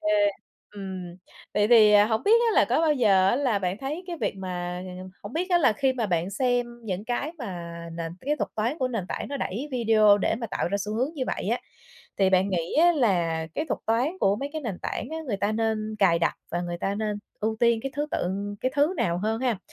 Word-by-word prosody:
OK, 210 Hz, -, 0 dB, 0.6 s
ừm, 190 Hz, -3 st, -7 dB, 0.4 s
vậy 210 Hz, 0 st, +3 dB
thì, 220 Hz, -3 st, +7 dB
à, 205 Hz, 0 st, +7 dB
hổng 220 Hz, 0 st, 0 dB
biết 415 Hz, -, +3 dB, 0.2 s
á, -, -, -1 dB
là -, -, +5 dB
có -, -, +2 dB
bao 320 Hz, -2 st, +3 dB
giờ 200 Hz, -8 st, +4 dB
á 240 Hz, -, +2 dB
là 255 Hz, -7 st, +1 dB
bạn 185 Hz, 0 st, -2 dB
thấy 300 Hz, +8 st, -4 dB
cái 350 Hz, -2 st, -5 dB
việc -, -, 0 dB
mà 180 Hz, -1 st, -4 dB, 0.4 s
hổng -, -, -8 dB
biết 360 Hz, +4 st, -2 dB
á, 350 Hz, -, +5 dB
là 275 Hz, -9 st, +4 dB
khi 265 Hz, +5 st, +1 dB
mà 240 Hz, -4 st, -1 dB
bạn 175 Hz, -1 st, 0 dB
xem 245 Hz, +3 st, +1 dB, 0.2 s
những 195 Hz, -1 st, -3 dB
cái 250 Hz, +6 st, -2 dB
mà 180 Hz, -, -6 dB, 0.2 s
nền 165 Hz, 0 st, -5 dB
cái 295 Hz, +3 st, -1 dB
thuật -, -, -2 dB
toán 235 Hz, +8 st, -1 dB
của 255 Hz, -, 0 dB
nền 225 Hz, -7 st, -3 dB
tảng -, -, -4 dB
nó 280 Hz, -, -3 dB
đẩy 260 Hz, +3 st, -3 dB
video 215 Hz, -4 st, +5 dB
để 205 Hz, -, +1 dB
mà 230 Hz, +1 st, -4 dB
tạo 190 Hz, -, -2 dB
ra 200 Hz, -, 0 dB
xu 210 Hz, +2 st, -3 dB
hướng 250 Hz, +5 st, +1 dB
như 280 Hz, -, -3 dB
vậy -, -, -3 dB
á, -, -, 0 dB, 0.6 s
thì 190 Hz, -1 st, +4 dB
bạn 190 Hz, +1 st, +3 dB
nghĩ 170 Hz, -4 st, -2 dB
á 345 Hz, +3 st, +6 dB
là 175 Hz, -, +1 dB
cái -, -, -1 dB
thuật -, -, -2 dB
toán 250 Hz, +11 st, +1 dB
của 195 Hz, +1 st, +3 dB
mấy 275 Hz, +6 st, -4 dB
cái 315 Hz, -, -3 dB
nền 210 Hz, -8 st, -4 dB
tảng -, -, -3 dB
á, 320 Hz, -, -4 dB
người 220 Hz, -6 st, -1 dB
ta 205 Hz, +2 st, 0 dB
nên 220 Hz, -1 st, -1 dB
cài 180 Hz, -4 st, +4 dB
đặt 165 Hz, -, +1 dB, 0.2 s
và 175 Hz, -, -1 dB
người 175 Hz, 0 st, -4 dB
ta 195 Hz, +3 st, -1 dB
nên 210 Hz, 0 st, -2 dB, 0.2 s
ưu 220 Hz, +1 st, -1 dB
tiên 235 Hz, -1 st, +4 dB
cái 270 Hz, -, -4 dB
thứ 295 Hz, +1 st, 0 dB
tự 180 Hz, -, -1 dB, 0.3 s
cái 255 Hz, -, -1 dB
thứ 295 Hz, +5 st, +2 dB
nào 170 Hz, -1 st, 0 dB
hơn 220 Hz, +4 st, -1 dB
ha? 245 Hz, -6 st, 0 dB
215 Hz, 250 wpm, -26 LUFS, 190-260 Hz, 0.6 s, thì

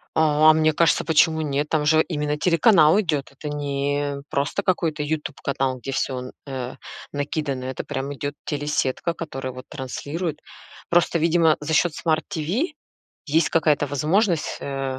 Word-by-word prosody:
О, 155 Hz, -1 st, +3 dB
а -, -, +8 dB
мне 155 Hz, 0 st, +3 dB
кажется, 165 Hz, +2 st, +3 dB
почему 160 Hz, 0 st, +3 dB
нет, 145 Hz, 0 st, -1 dB
там 150 Hz, -1 st, 0 dB
же 155 Hz, +1 st, +5 dB
именно 150 Hz, -2 st, -2 dB
телеканал 170 Hz, 0 st, +5 dB
идет, 150 Hz, -6 st, -2 dB
это 150 Hz, +2 st, -7 dB
не 145 Hz, 0 st, -2 dB
просто 145 Hz, +8 st, -1 dB
какой-то 165 Hz, -5 st, 0 dB
"Ютуб" 150 Hz, -1 st, -3 dB
канал, 135 Hz, -2 st, -1 dB
где 135 Hz, -, -5 dB
всё 130 Hz, -1 st, -1 dB
н 125 Hz, 0 st, -7 dB, 0.2 s
э, 130 Hz, -2 st, -5 dB, 0.4 s
накидано, 145 Hz, -2 st, -3 dB
это 130 Hz, -, -4 dB
прямо 135 Hz, +2 st, -4 dB
идет 145 Hz, +1 st, -4 dB
телесетка, 145 Hz, +2 st, -1 dB
которая 135 Hz, -6 st, -5 dB
вот 130 Hz, 0 st, -10 dB
транслирует. 150 Hz, +4 st, -4 dB, 0.5 s
Просто, 170 Hz, -1 st, +3 dB
видимо, 165 Hz, -1 st, +3 dB
за 155 Hz, +2 st, -3 dB
счет 175 Hz, +1 st, +3 dB
Smart 160 Hz, 0 st, 0 dB
TV 185 Hz, -, 0 dB, 0.6 s
есть 155 Hz, +2 st, +2 dB
какая-то 150 Hz, -3 st, +2 dB
возможность, 160 Hz, -, +1 dB
э, 135 Hz, -1 st, -3 dB
150 Hz, 155 wpm, -23 LUFS, 140-160 Hz, 0.6 s, а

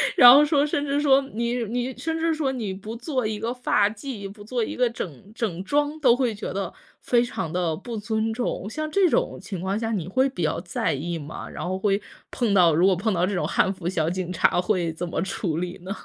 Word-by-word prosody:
然 245 Hz, 0 st, +10 dB
后 285 Hz, +3 st, +8 dB
说 295 Hz, -1 st, +3 dB
甚 290 Hz, -1 st, -1 dB
至 280 Hz, +1 st, +1 dB
说， 275 Hz, -2 st, +5 dB
你 235 Hz, +2 st, -1 dB
你 245 Hz, +3 st, -3 dB
甚 320 Hz, +6 st, -3 dB
至 330 Hz, 0 st, +1 dB
说 305 Hz, -4 st, 0 dB
你 225 Hz, -7 st, -3 dB
不 210 Hz, +4 st, -7 dB
做 255 Hz, 0 st, -2 dB
一 215 Hz, -1 st, -3 dB
个 230 Hz, +3 st, -2 dB
发 250 Hz, -5 st, +2 dB
髻， 215 Hz, -1 st, -6 dB
不 205 Hz, 0 st, -12 dB
做 235 Hz, +2 st, -1 dB
一 -, -, -4 dB
个 250 Hz, -1 st, +2 dB
整 195 Hz, -, -7 dB
整 190 Hz, -6 st, -2 dB
装， 290 Hz, +7 st, 0 dB
都 250 Hz, -5 st, +5 dB
会 250 Hz, -3 st, 0 dB
觉 210 Hz, +1 st, -5 dB
得， 195 Hz, -1 st, -3 dB, 0.3 s
非 240 Hz, -1 st, +3 dB
常 165 Hz, -9 st, -4 dB
地 175 Hz, -3 st, 0 dB
不 230 Hz, +7 st, -7 dB
尊 220 Hz, +1 st, -1 dB
重， 240 Hz, -4 st, -3 dB
像 310 Hz, +6 st, -4 dB
这 385 Hz, +2 st, +4 dB
种 -, -, 0 dB
情 190 Hz, -5 st, -6 dB
况 190 Hz, +2 st, -1 dB
下 225 Hz, 0 st, -2 dB
你 185 Hz, -7 st, -2 dB
会 260 Hz, +8 st, +2 dB
比 260 Hz, -, -6 dB
较 155 Hz, -, 0 dB
在 175 Hz, -1 st, -1 dB
意 165 Hz, +5 st, -3 dB
吗？ 150 Hz, +2 st, -7 dB
然 -, -, -6 dB
后 185 Hz, +1 st, -1 dB
会 200 Hz, +1 st, +1 dB, 0.3 s
碰 235 Hz, -5 st, 0 dB
到 175 Hz, -4 st, +6 dB
如 170 Hz, +4 st, +4 dB
果 190 Hz, -, +4 dB
碰 205 Hz, +4 st, 0 dB
到 175 Hz, -1 st, +2 dB
这 200 Hz, -, -2 dB
种 180 Hz, -, 0 dB
汉 190 Hz, -, +2 dB
服 185 Hz, -3 st, -6 dB
小 165 Hz, -3 st, 0 dB
警 180 Hz, 0 st, -3 dB
察 175 Hz, -, +3 dB
会 180 Hz, -3 st, 0 dB
怎 170 Hz, +2 st, -5 dB
么 170 Hz, -, -2 dB
处 170 Hz, -3 st, -2 dB
理 180 Hz, +1 st, -3 dB
呢？ 185 Hz, -, -6 dB
215 Hz, 260 characters per minute, -24 LUFS, 185-250 Hz, 0.3 s, 然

